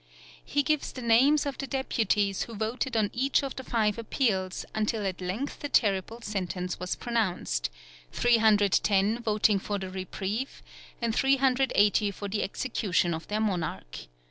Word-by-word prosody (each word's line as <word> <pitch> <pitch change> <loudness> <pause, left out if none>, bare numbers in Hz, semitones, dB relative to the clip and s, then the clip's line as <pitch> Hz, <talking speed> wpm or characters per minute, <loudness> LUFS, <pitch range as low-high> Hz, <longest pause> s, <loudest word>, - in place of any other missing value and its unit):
He 285 0 0
gives 305 +2 0
the 255 - -8
names 265 +7 +4
of 280 -2 -4
the 275 - -3
deputies 210 -7 0
who 230 - -5
voted 225 +3 -2
on 210 -2 +1
each 270 +3 +1
of 275 - -4
the 260 - -6
five 220 -3 0
appeals, 210 -6 -1
until 215 -1 -1
at 185 -1 -3
length 195 +10 -4
the 290 - -4
terrible 210 0 +1
sentence 180 -4 -3
was 180 0 -2
pronounced, 190 - -1 0.4
310 215 -1 +3
voting 210 -2 +2
for 205 +1 -3
the 190 -1 -6
reprieve 190 +6 -4 0.4
and 230 -1 +1
380 260 -7 +3
for 200 +1 -6
the 205 +1 -2
execution 190 -5 0
of 160 +1 -6
their 210 +1 -1
monarch. 170 - -3
215 Hz, 150 wpm, -28 LUFS, 195-245 Hz, 0.4 s, names